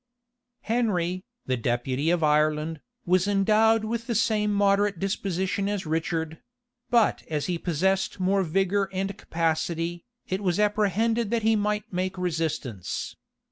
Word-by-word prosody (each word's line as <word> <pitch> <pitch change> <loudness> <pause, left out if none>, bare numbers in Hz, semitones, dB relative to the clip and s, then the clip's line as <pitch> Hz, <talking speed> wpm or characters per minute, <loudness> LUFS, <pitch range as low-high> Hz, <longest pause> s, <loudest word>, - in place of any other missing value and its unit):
Henry, 185 -6 0 0.2
the 130 -1 0
deputy 125 +5 -1
of 175 -1 +2
Ireland, 150 +1 +1 0.2
was 185 +1 +3
endowed 215 +2 +3
with 230 +1 -3
the 235 - -1
same 210 -1 +2
moderate 200 -1 +2
disposition 195 +1 -1
as 205 -3 -2
Richard; 160 0 -2 0.5
but 235 -3 +3
as 150 -2 -1
he 175 -2 -2
possessed 190 +4 0
more 190 +2 +2
vigor 195 +3 +1
and 195 +1 -2
capacity, 165 0 -2 0.2
it 190 +2 -2
was 180 -1 0
apprehended 210 +2 +1
that 230 -1 0
he 220 0 +4
might 210 0 -1
make 185 +1 -2
resistance. 155 - -3
190 Hz, 135 wpm, -26 LUFS, 165-210 Hz, 0.5 s, he